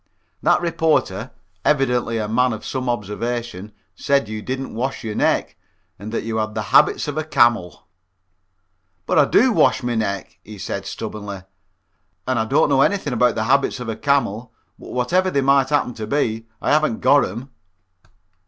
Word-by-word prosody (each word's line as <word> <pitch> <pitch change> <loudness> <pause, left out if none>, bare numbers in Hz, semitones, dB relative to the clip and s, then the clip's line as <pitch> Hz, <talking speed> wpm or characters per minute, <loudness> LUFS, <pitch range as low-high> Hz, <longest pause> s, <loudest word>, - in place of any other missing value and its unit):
"That - - +3
reporter, 165 -2 0 0.3
evidently 125 -5 +1
a 105 -1 -2
man 125 +3 +2
of 110 - -8
some 130 -2 -3
observation, 115 -1 -4 0.2
said 140 -4 +1
you 110 0 -5
didn't 130 +3 -5
wash 130 +4 -3
your 110 -2 -4
neck - - 0 0.4
and 105 +2 -7
that 115 - -2
you 110 0 -3
had 110 0 -2
the 110 - -2
habits - - +4
of 145 +1 -2
a - - -1
camel." 120 - +1 1.2
"But - - +2
I 145 - +6
do 250 - +4
wash 130 - +3
my 120 0 -1
neck," 105 -3 -3
he 105 0 -11
said, - - -5
stubbornly, 100 -3 -6 0.8
"and 130 -2 +1
I 110 - 0
don't 145 +7 +2
know 135 -1 +3
anything 185 -5 +1
about 125 0 +2
the 110 - -1
habits 135 +2 +1
of 125 -2 -5
a 110 - -2
camel, 120 -3 0 0.3
but - - -11
whatever 180 +10 +1
they 140 -6 +1
might 135 0 +3
happen 145 -4 +1
to 110 -1 -6
be, 115 -4 -1 0.2
I - - +1
haven't 155 -6 +2
got 145 0 +5
'em." 120 +8 -8
120 Hz, 175 wpm, -21 LUFS, 110-140 Hz, 1.2 s, I